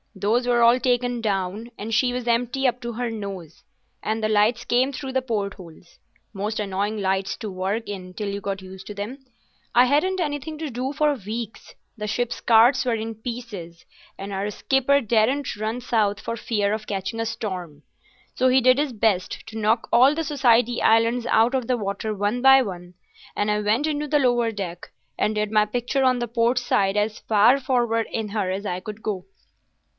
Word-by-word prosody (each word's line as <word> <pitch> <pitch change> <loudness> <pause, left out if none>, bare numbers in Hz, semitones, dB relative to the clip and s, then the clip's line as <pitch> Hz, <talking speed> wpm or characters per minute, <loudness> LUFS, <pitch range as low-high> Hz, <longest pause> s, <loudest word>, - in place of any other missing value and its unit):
Those 215 +6 +1
were 240 -1 +3
all 235 +2 +6
taken 245 -1 0
down, 200 +1 -2
and 220 +2 -5
she 245 +2 +3
was 245 -1 -4
empty 245 +3 +1
up 245 0 -1
to 235 -1 -4
her 240 +1 -3
nose, 195 -7 -7 0.4
and 220 +1 -1
the 215 - +1
lights 220 +3 +2
came 255 +3 +2
through 265 -1 -6
the 260 - +1
port 210 -6 -2
holes—most 195 +4 -9
annoying 205 +1 -2
lights 190 0 -1
to 215 -3 -6
work 195 +5 -2
in 185 -3 -7
till 210 - -4
you 200 0 -4
got 195 -1 -4
used 190 0 -11
to 210 - -6
them. 210 +7 -5 0.6
I 245 +1 +7
hadn't 305 +8 +1
anything 305 -1 -3
to 315 -1 -4
do 255 +3 -3
for 300 0 +2
weeks. 225 -1 -7 0.2
The 210 0 -4
ship's 240 +3 -2
charts 235 +3 +5
were 245 -3 0
in 225 0 -4
pieces 220 -8 -7 0.3
and 195 +1 -6
our 195 +2 -2
skipper 270 +6 +2
daren't 240 +5 +1
run 215 +3 -3
south 215 -4 0
for 230 - -4
fear 210 -3 -1
of 215 0 -4
catching 195 +3 -3
a 225 - 0
storm. 180 -9 -5 0.5
So 255 0 +3
he 260 +1 +5
did 255 +1 +4
his 290 -3 -1
best 205 -4 0
to 225 0 -8
knock 220 +2 +1
all 255 +4 +6
the 325 - -1
Society 245 -4 +2
Islands 230 +2 +3
out 230 +3 +3
of 255 -3 -1
the 250 - +1
water 205 +1 -3
one 205 +4 -1
by 270 0 +7
one, 180 -4 -8 0.4
and 205 - 0
I 210 0 +1
went 220 +8 +1
into 300 -1 -2
the 295 +1 +2
lower 240 -3 +2
deck, 180 -5 -6 0.3
and 215 - 0
did 210 0 -1
my 215 -1 +4
picture 245 +5 -1
on 255 -1 +3
the 240 - -2
port 235 +2 +1
side 200 -5 +1
as 210 +1 0
far 220 +5 +4
forward 240 -4 0
in 220 -2 -3
her 200 -3 -1
as 195 +2 -4
I 180 -2 -2
could 210 +2 -8
go. 190 -4 -3
225 Hz, 200 wpm, -23 LUFS, 205-245 Hz, 0.6 s, I